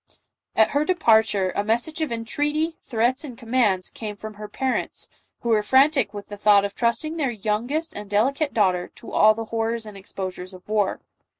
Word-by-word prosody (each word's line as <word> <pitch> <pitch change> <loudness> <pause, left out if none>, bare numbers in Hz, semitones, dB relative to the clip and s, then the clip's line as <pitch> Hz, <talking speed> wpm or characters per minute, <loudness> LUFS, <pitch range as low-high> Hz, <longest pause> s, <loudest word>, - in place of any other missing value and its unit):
At 220 - +4
her 290 +1 +2
departure, 220 - +3
a 200 - +1
message 240 +9 -1
of 310 -5 -1
entreaty, 295 +8 -1
threats 245 +4 0
and 255 -6 -8
commands 225 -7 +1
came 210 -2 -6
from 215 +1 -8
her 210 0 -8
parents, 260 +5 -2 0.3
who 235 - -3
were 220 -2 +4
frantic 270 +2 +3
with 205 -1 -7
the 205 - -7
thought 200 -1 +5
of 200 - -4
trust 235 +3 0
ing 315 +2 -4
their 285 -5 0
youngest 235 +9 -2
and 210 -1 -7
delicate 270 +9 +1
daughter 185 -5 +1
to - - -11
all 215 0 +5
the 225 0 -4
hor 225 0 0
rors 230 -1 -5
and 210 -1 -10
exposures 190 -1 -7
of 180 - -16
war. 210 -2 0
225 Hz, 195 wpm, -24 LUFS, 205-265 Hz, 0.3 s, thought